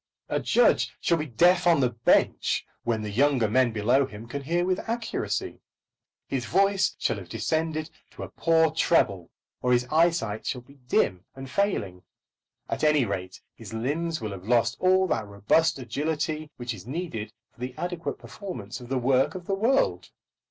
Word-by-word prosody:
A - - 0
judge - - +3
shall 170 -1 +1
be 150 - -3
deaf 175 +7 +4
on 170 -3 +5
the 125 -2 +2
bench 115 0 +2 0.2
when 115 -2 -1
younger 120 +3 +2
men 125 +2 +3
below 120 +5 +2
him 110 -1 -10
can 140 +4 -5
hear 170 +5 0
with 185 0 0
accuracy. 230 0 -2 0.7
His 125 -4 -3
voice 195 - +2
shall - - 0
have 90 -3 -10
descended 155 - -2 0.2
to - - -9
a - - -7
poor 160 -1 +3
treble, 100 - +2 0.3
or 125 - +1
his 120 0 +2
eyesight 160 -10 +1
shall 125 - -2
be 140 +3 -20
dim 90 -6 +1
and 135 0 -8
failing. 100 - -1 0.7
At - - -3
any 150 -4 +4
rate, 95 -3 -5
his - - -9
limbs 160 +8 -1
will 110 -2 -4
have 95 0 -9
lost 120 -1 +3
all 185 +1 +4
that 115 - -1
robust 100 +12 +2
agility 150 +4 -2
which 120 -1 -4
is 100 -1 -11
needed 130 -8 -4 0.2
for - - -28
the 125 +1 -5
adequate 175 -1 -3
performance 125 - -8
of 120 -1 -11
the 135 - 0
work 130 +4 +2
of 180 -2 -7
the 195 - -1
world. 230 +8 +1
135 Hz, 175 wpm, -26 LUFS, 115-165 Hz, 0.7 s, on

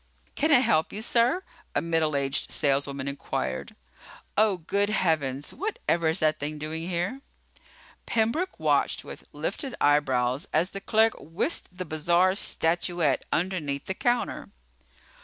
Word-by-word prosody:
"Can 310 - +1
I 260 -4 +7
help 220 -11 +2
you, 215 - -4
sir?" 245 +11 +2 0.3
a - - +4
middle 165 -3 +1
aged 135 -1 -1
saleswoman 140 -1 0
inquired. 65 - -3 0.6
"Oh, 210 -3 +3
good 200 +5 0
heavens, 150 -9 0
whatever 270 - -1
is 160 +3 +1
that 155 -1 +2
thing 150 +1 -3
doing 160 +3 -4
here?" 180 +10 -2 0.9
Pembroke 235 +12 0
watched - - +1
with - - -11
lifted 270 -4 -3
eyebrows 130 -2 +2
as 165 +4 +2
the 195 - -6
clerk 220 +2 +3
whisked 165 - -1
the 185 - -4
bizarre 170 +4 +2
statuette 170 -5 0
underneath 155 -6 -1
the 190 - -2
counter. 245 +2 -1
170 Hz, 135 wpm, -27 LUFS, 145-215 Hz, 0.9 s, I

